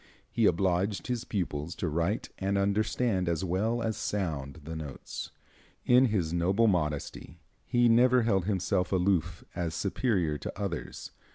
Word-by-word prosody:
He 115 -3 +3
obliged 95 +2 +1
his 125 -1 -2
pupils 85 -5 -3
to 100 -5 -2
write 85 +7 -1
and 100 +1 0
understand 100 -1 +1
as 85 +2 -1
well 110 +7 0
as 110 -1 -1
sound 80 -7 -3
the 80 +2 -6
notes. 75 -4 -6 0.6
In 125 +1 +6
his 95 -9 0
noble 95 +6 +2
modesty 80 -4 -1 0.3
he 120 -1 +3
never 125 +1 +5
held 95 -6 +1
himself 95 -1 0
aloof 95 -2 +1
as 85 -1 -3
superior 90 - 0
to - - -5
others. 100 -6 -5
95 Hz, 145 wpm, -29 LUFS, 85-110 Hz, 0.6 s, In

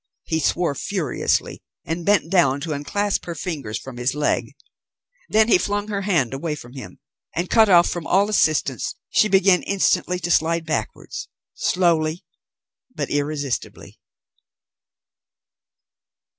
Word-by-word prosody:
He 160 - -1
swore 165 +1 +1
furiously, 160 -1 -1 0.2
and 165 +2 -3
bent 185 -3 +2
down 145 -8 +3
to 160 0 -3
unclasp 200 +8 -2
her 170 - -5
fingers 145 - -4
from 130 -2 -9
his 125 +3 -1
leg. 150 0 -1 0.7
Then 220 +1 +4
he 210 - +5
flung 205 +2 -2
her 200 -1 -2
hand 165 - +1
away 150 +3 -3
from 120 -4 -12
him; 110 -10 -10 0.4
and 175 +2 -2
cut 220 -2 +5
off 175 -2 +6
from 175 -2 -4
all 195 +3 +3
assistance 155 - +1 0.2
she 215 - +4
began 195 -1 +4
instantly 180 -2 +1
to 175 -1 -3
slide 165 0 +2
backwards, 150 -9 -4 0.2
slowly 170 -2 +1 0.7
but 145 - -3
irresistibly. 145 -2 -3
165 Hz, 130 wpm, -22 LUFS, 145-190 Hz, 0.7 s, off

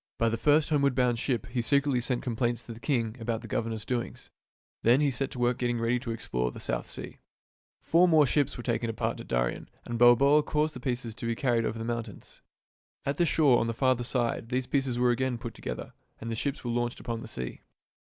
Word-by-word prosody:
By 115 - +2
the 115 - 0
first 150 +6 +3
homeward 140 -3 +3
bound 125 -2 +2
ship 120 -5 -1
he 120 0 -2
secretly 140 +1 +2
sent 120 0 -2
complaints 120 0 -1
to 115 - -8
the 110 - -12
king 115 -5 -1
about 115 0 -2
the - - -7
governor's 110 -1 -2
doings. 120 -1 -4 0.5
Then 120 +4 +5
he 145 -2 +2
set 135 +1 -2
to - - -9
work 120 0 +1
getting 120 -1 0
ready 115 +2 +1
to 120 -1 -7
explore 60 - -2
the - - -9
South - - -3
Sea. - - -7 0.6
Four 170 +3 +4
small 155 -3 +5
ships 145 +1 +1
were 120 - -6
taken 115 -1 -1
apart 110 - -2
at - - -9
Darien, - - -1 0.2
and 120 -1 -4
Balboa 135 +5 +6
caused 150 +1 0
the - - -8
pieces 120 -3 -3
to 115 - -6
be 115 - 0
carried 120 -2 +1
over 115 - -3
the 115 - -4
mountains. 115 -3 -6 0.6
At 140 +1 -1
the 175 - +3
shore 145 -6 +4
on 115 - 0
the 115 - -2
farther 130 -1 +2
side 120 -2 -1
these 125 0 0
pieces 135 -2 0
were 125 0 +3
again 125 0 0
put 115 0 -7
together, 60 - -6 0.3
and 115 +1 -5
the - - -1
ships 140 +5 -3
were 120 - -2
launched 120 0 -1
upon 115 -1 -4
the - - -8
sea. 65 -1 -6
120 Hz, 230 wpm, -28 LUFS, 115-135 Hz, 0.6 s, Balboa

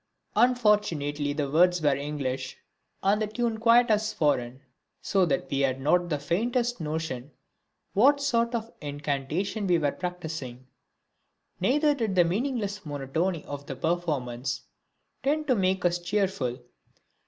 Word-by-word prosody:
Unfortunately 210 - +2
the 145 -1 -1
words 180 +3 +4
were 145 -3 +3
English 135 -2 -4 0.5
and 205 +2 +3
the 215 - +1
tune 225 +1 -2
quite 235 +1 +5
as 215 0 +2
foreign, 130 -7 0 0.4
so 190 -3 +2
that 140 -3 0
we 140 - 0
had 135 -1 +1
not 175 +6 +2
the 150 - 0
faintest 235 - -1
notion 150 -4 -3 0.6
what 280 +8 +5
sort 235 -4 +1
of 230 0 -4
incantation 150 +8 -2
we 175 -1 +4
were 145 -3 +1
practising; 160 -8 -6 0.9
neither 295 - +3
did 225 -8 -2
the 180 - +6
meaningless 205 +1 -2
monotony 150 +4 -2
of 140 0 -7
the 135 - -5
performance 135 -7 -2 0.6
tend 300 +3 0
to 270 - +3
make 190 -3 +1
us 175 0 +2
cheerful. 175 -9 -1
175 Hz, 135 wpm, -27 LUFS, 145-215 Hz, 0.9 s, the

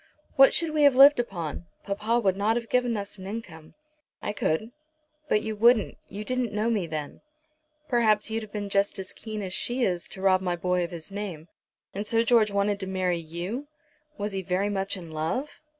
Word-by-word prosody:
What 270 0 +8
should 330 -2 +1
we 305 -1 +1
have 285 -3 +6
lived 275 +1 +8
upon? 170 -7 -4 0.2
Papa 215 +4 0
would 195 -5 +2
not 210 +3 +1
have 235 -1 -3
given 245 -2 +1
us 200 0 -6
an 190 - -8
income." 185 -7 -8 0.4
"I 205 - -3
could." 210 +4 -1 0.6
"But 210 - +2
you 220 -1 -3
wouldn't. 230 0 +4
You 205 +2 -6
didn't 255 -1 -1
know 215 +3 +1
me 200 -7 0
then." 155 -2 -5 0.7
"Perhaps 220 -3 +2
you'd 225 0 -1
have 215 -2 -10
been 205 -1 -4
just 200 +1 +1
as 190 -1 -7
keen 215 -2 -6
as 185 -2 -3
she 245 +5 0
is 180 -5 0
to 190 - -8
rob 190 -1 +4
my 180 -2 -1
boy 180 +1 0
of 170 - -3
his 170 +1 -9
name. 190 -6 -6 0.4
And 205 +2 -4
so 230 +1 +2
George 230 -2 +4
wanted 200 0 0
to 190 - -5
marry 185 -2 0
you! 175 - -5 0.5
Was 205 0 -3
he 195 -1 -3
very 190 +2 0
much 195 0 -1
in 170 -3 -9
love?" 160 - -3
205 Hz, 205 wpm, -27 LUFS, 185-230 Hz, 0.7 s, What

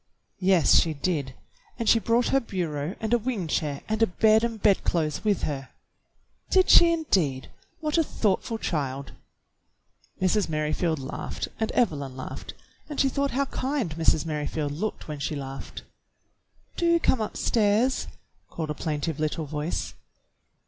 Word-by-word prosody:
"Yes, 185 -4 +5
she 160 -2 0
did, 140 -4 -2 0.4
and 230 -2 -3
she 230 - +6
brought 235 +2 +2
her 270 - +4
bureau 170 - -3
and 220 +1 -1
a 240 - +4
wing 225 -5 -2
chair 150 -2 -1
and 220 +1 -1
a 225 - +6
bed 220 +4 +4
and 230 -2 -2
bedclothes 170 -6 +1
with 205 -4 +1
her." 135 -3 -3 0.8
"Did 375 -1 +4
she, 340 -1 +8
indeed.? 180 - 0 0.3
What 305 +1 +1
a - - +4
thoughtful 225 -3 -1
child!" 140 -8 -3 1.1
Mrs. 190 +1 +1
Merrifield 155 +2 0
laughed 135 0 -5
and 220 - 0
Evelyn 140 - 0
laughed, 130 - -7 0.3
and 295 - -5
she 270 - +4
thought 280 +1 0
how 280 - +2
kind 260 - -2
Mrs. 160 0 +2
Merrifield 150 -1 -2
looked 195 +9 -4
when 150 -2 -5
she 140 +2 -2
laughed. 135 -1 -7 0.9
"Do 340 0 +3
come 260 -7 +2
upstairs," 220 +3 +1 0.4
called 160 -2 -4
a - - -1
plaintive 150 0 -3
little 155 +1 -1
voice. 150 +3 -3
180 Hz, 150 wpm, -26 LUFS, 150-230 Hz, 1.1 s, she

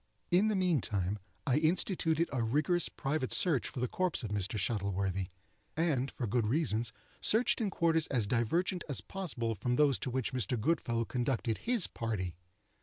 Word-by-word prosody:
In 185 +5 +4
the 215 - +1
meantime, 105 - 0 0.3
I 130 - +2
instituted 165 0 +1
a 130 - 0
rigorous 150 +10 +1
private 135 -1 -2
search 155 -9 +3
for - - -7
the 125 - 0
corpse 185 0 0
of 110 - -4
Mr. 100 0 -1
Shuttleworthy, 95 -2 -1 0.5
and, 145 -5 +1
for 125 - -4
good 115 0 +1
reasons, 120 -4 +1 0.3
searched 235 +2 +3
in 210 - +1
quarters 165 -3 +2
as 120 -6 0
divergent 165 - 0
as 140 - -1
possible 135 -12 -3
from 120 +4 -1
those 140 -1 +3
to - - -3
which 130 -1 -2
Mr. 125 -1 -1
Goodfellow 120 -4 0
conducted 120 -2 -1
his 235 -6 +2
party. 105 -6 -3
130 Hz, 165 wpm, -32 LUFS, 110-165 Hz, 0.5 s, In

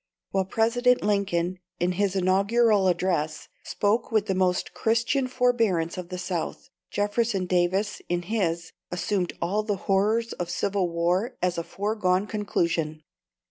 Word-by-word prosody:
While 190 -1 +1
President 245 +5 +2
Lincoln, 185 -3 0 0.2
in 175 +1 +1
his 195 +1 0
Inaugural 200 +2 +3
Address, 170 -4 0
spoke 220 +4 0
with 215 -2 +2
the 195 - 0
most 185 -1 0
Christian 230 +4 +1
forbearance 230 -10 +1
of 180 -2 -6
the 180 - -5
South, 180 -2 -4 0.2
Jefferson 205 -1 0
Davis, 185 +3 0
in 175 0 0
his, 175 -4 -1 0.2
assumed 180 +1 -1
all 200 +5 +1
the 210 -1 -1
horrors 215 +4 +2
of 175 -1 -4
civil 190 0 0
war 175 +6 0
as 180 -1 0
a - - -2
foregone 195 +1 0
conclusion. 170 -7 -1
190 Hz, 140 wpm, -26 LUFS, 175-215 Hz, 0.2 s, Inaugural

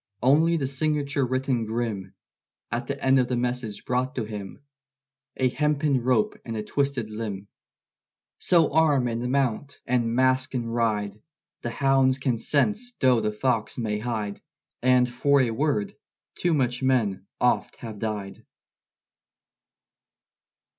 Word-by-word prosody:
Only 160 +6 +4
the 135 -4 -1
signature 140 0 0
written 130 -1 0
grim 110 -4 -3 0.6
At - - -2
the - - -3
end 135 0 +4
of 125 - +2
the 125 - -1
message 120 -3 -2
brought 130 +3 -1
to 120 - -1
him 105 +4 -8 0.7
A 130 - +3
hempen 150 0 +1
rope 120 -3 +1
and 115 -1 -5
a 105 - -3
twisted 135 -3 -1
limb. 105 -3 -5 0.9
So 165 -5 +3
arm 150 -5 +3
and 120 +1 -2
mount! 140 0 -1
and 120 -2 0
mask 130 +1 +2
and 115 -2 -2
ride! 110 -3 -1 0.4
The 120 - -3
hounds 135 0 +3
can 130 -4 -1
sense 210 - 0
though 125 -3 +4
the 105 - 0
fox 110 0 -1
may 105 -3 -1
hide! 110 -3 -3 0.4
And 125 0 +4
for 140 +4 +2
a 125 -3 +2
word 115 -4 0 0.4
too 175 -2 +1
much 125 -3 0
men 120 -8 +1
oft - - +1
have 110 -3 -8
died. 105 -3 -4
125 Hz, 140 wpm, -25 LUFS, 110-135 Hz, 0.9 s, Only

